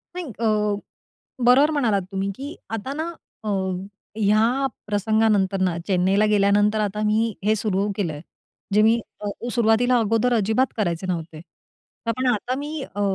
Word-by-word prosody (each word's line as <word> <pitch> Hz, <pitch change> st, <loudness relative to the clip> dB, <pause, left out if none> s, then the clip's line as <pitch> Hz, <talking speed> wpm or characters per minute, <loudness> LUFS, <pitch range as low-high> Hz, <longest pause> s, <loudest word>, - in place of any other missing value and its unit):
नाही, 360 Hz, -1 st, -4 dB
अ, 230 Hz, -, 0 dB, 1.0 s
बरोबर 265 Hz, +5 st, +6 dB
म्हणालात 235 Hz, -10 st, +1 dB
तुम्ही, 195 Hz, +1 st, -1 dB
की 280 Hz, +2 st, -7 dB, 0.2 s
आता 260 Hz, +6 st, -5 dB
ना 320 Hz, +3 st, -3 dB, 0.3 s
अ, 215 Hz, -, -3 dB, 0.7 s
या 225 Hz, +6 st, +2 dB, 0.2 s
प्रसंगानंतर 205 Hz, -2 st, +1 dB
ना 180 Hz, -3 st, +1 dB
चेन्नईला 190 Hz, +2 st, +2 dB
गेल्यानंतर 205 Hz, +1 st, +3 dB
आता 210 Hz, 0 st, -1 dB
मी 220 Hz, +1 st, +1 dB
हे 215 Hz, +1 st, +3 dB
सुरू 200 Hz, -1 st, 0 dB
केलंय. 160 Hz, -8 st, -2 dB, 0.5 s
जे 210 Hz, +1 st, +5 dB
मी 225 Hz, +2 st, +4 dB, 0.2 s
अ, 205 Hz, -, -3 dB, 0.2 s
सुरुवातीला 240 Hz, +1 st, +3 dB
अगोदर 225 Hz, +3 st, +1 dB
अजिबात 220 Hz, +4 st, +1 dB
करायचे 185 Hz, -4 st, -1 dB
नव्हते, 165 Hz, -3 st, -4 dB, 0.7 s
पण 255 Hz, +3 st, -1 dB
आता 240 Hz, +3 st, -2 dB
मी 295 Hz, +1 st, -5 dB
अ, 205 Hz, -, -3 dB
215 Hz, 140 wpm, -23 LUFS, 200-240 Hz, 1.0 s, बरोबर